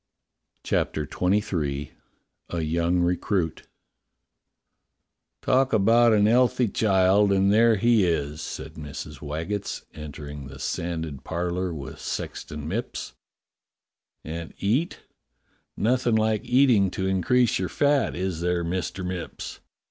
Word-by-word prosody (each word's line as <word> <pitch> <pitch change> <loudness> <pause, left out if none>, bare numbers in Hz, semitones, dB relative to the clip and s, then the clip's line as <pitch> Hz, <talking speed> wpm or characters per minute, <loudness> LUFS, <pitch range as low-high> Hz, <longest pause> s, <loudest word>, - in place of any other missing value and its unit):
CHAPTER 75 - 0
XXIII 85 -6 -1 0.6
A 85 - -2
YOUNG 85 +3 +1
RECRUIT 90 -1 -1 1.8
TALK 130 0 +2
about 115 +3 +5
an 105 -1 +4
'ealthy 125 0 +3
child, 100 0 +3
and 100 +1 +3
there 115 +1 +5
he 115 0 +4
is," 75 -3 -1
said 75 +4 -6
Mrs. 75 -1 -8
Waggetts, 80 +8 -4
entering 75 -2 -8
the 70 0 -10
sanded 80 -2 -4
par 85 +1 -2
lour 90 0 -2
with 70 -5 -7
Sexton 75 -2 -5
Mipps. 100 - -4 1.1
i.\nd 80 +1 -6
eat; 125 - 0 0.8
nothing 120 +1 +2
like 110 0 +1
eating 125 -6 +4
to 95 +1 -3
increase 120 +6 +2
your 95 - -2
fat, 145 -1 +2
is 90 -2 -2
there. 90 0 0
Mister 95 +2 -3
Mipps? 90 -1 -5
95 Hz, 115 wpm, -25 LUFS, 80-110 Hz, 1.8 s, about